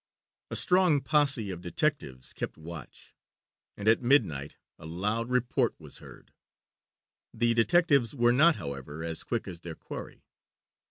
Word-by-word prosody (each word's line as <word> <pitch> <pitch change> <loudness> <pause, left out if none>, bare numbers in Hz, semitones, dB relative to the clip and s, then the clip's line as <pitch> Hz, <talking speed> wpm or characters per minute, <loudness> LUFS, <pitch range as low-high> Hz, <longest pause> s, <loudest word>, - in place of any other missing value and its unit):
A - - -4
strong 180 -6 +3
posse 140 -10 +2
of 90 -2 -7
detectives 90 - -2
kept - - -5
watch, 80 -2 -11 0.6
and 105 - -5
at 115 +2 +5
midnight 80 - +1 0.2
a - - -10
loud 105 +8 -2
report 125 -1 0
was - - -11
heard. - - -15 1.0
The 120 +1 +2
detectives 140 0 +3
were 120 -2 +3
not, 155 +5 +5
however, 70 +3 -6
as 80 -1 -4
quick 120 -3 -3
as 90 -3 -7
their 85 -2 -8
quarry. - - -9
115 Hz, 140 wpm, -29 LUFS, 85-140 Hz, 1.0 s, at